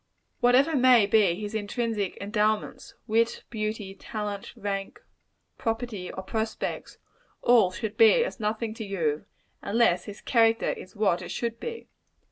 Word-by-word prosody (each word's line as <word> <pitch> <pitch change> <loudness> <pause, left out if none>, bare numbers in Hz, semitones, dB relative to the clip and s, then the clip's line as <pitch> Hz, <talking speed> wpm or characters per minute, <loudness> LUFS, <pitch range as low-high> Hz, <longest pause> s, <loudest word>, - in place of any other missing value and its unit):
Whatever 265 +6 +4
may 250 -4 +6
be 200 -4 +3
his 210 +2 -6
extrinsic 215 -1 -2
endowments 210 +1 -1
wit, 230 +1 +1
beauty, 215 -3 -3
talent, 205 -1 -5
rank, 200 -3 -4 0.6
property 225 -5 -3
or 190 - -7
prospects 220 +3 -4 0.5
all 235 -6 +5
should 210 +3 -5
be 350 - +6
as - - -6
nothing 220 +1 -2
to 225 - -6
you, 165 -7 -2 0.4
unless 200 -5 +2
his 205 -1 -9
character 225 -1 +3
is 185 - -9
what 195 -4 +1
it 175 - -7
should 230 -1 -3
be. 465 -1 -6
215 Hz, 135 wpm, -27 LUFS, 200-230 Hz, 0.6 s, may